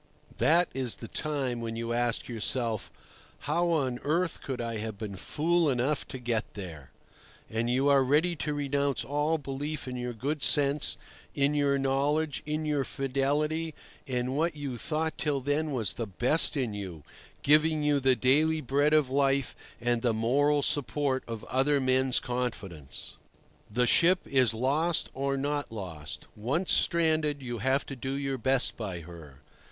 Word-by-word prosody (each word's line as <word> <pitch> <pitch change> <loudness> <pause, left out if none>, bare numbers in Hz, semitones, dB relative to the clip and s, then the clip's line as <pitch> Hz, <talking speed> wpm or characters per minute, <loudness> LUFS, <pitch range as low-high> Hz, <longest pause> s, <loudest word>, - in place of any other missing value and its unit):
That 170 +2 +4
is 130 -3 -1
the 115 - -9
time 135 -5 -2
when 115 -1 -4
you 115 0 -3
ask 120 0 0
yourself, 115 -1 -1 0.5
How 170 +4 +1
on 135 -7 0
earth 165 +3 0
could 130 -2 -4
I 115 -1 -3
have 110 -1 -5
been 105 -2 -6
fool 165 - +1
enough 135 +3 0
to - - -6
get 120 -3 -2
there? 85 -9 -8 0.6
And 115 +1 -1
you 130 +3 +2
are 140 -1 +5
ready 155 +6 +2
to 150 0 -2
renounce 140 -3 0
all 145 +4 +1
belief 145 +1 -5
in 125 - -4
your 125 0 -3
good 140 +6 -3
sense, 145 0 +2 0.4
in 140 +1 +2
your 140 -1 +2
knowledge, 140 +3 0
in 155 +1 -2
your 145 -2 +1
fidelity, 145 +5 -1 0.3
in 125 0 -1
what 165 +2 0
you 140 -4 -4
thought 155 +6 -2
till 145 -2 0
then 145 +4 0
was 115 -8 0
the 115 - -4
best 125 - +4
in 125 -6 -1
you, 95 -7 -7 0.4
giving 155 +1 +4
you 145 -1 +3
the 130 -1 +4
daily 150 +6 +3
bread 145 +3 +2
of 145 -4 +2
life 140 -1 +1 0.2
and 120 0 0
the 115 -2 +1
moral 140 +6 +2
support 135 0 0
of 115 -2 -6
other 140 +2 +2
men's 130 0 +3
confidence. 100 - -5 0.5
The 125 +4 +1
ship 175 +9 +4
is 130 -3 +3
lost 145 +9 0
or 135 +1 -1
not 145 0 -2
lost. 80 -8 -7
Once 140 - -1
stranded, 155 -4 +2
you 120 -2 -4
have 135 +5 +1
to 135 - -7
do 130 +2 -4
your 135 -1 -2
best 130 +1 +2
by 95 -6 -5
her. 80 -5 -12
135 Hz, 165 wpm, -29 LUFS, 120-150 Hz, 0.6 s, are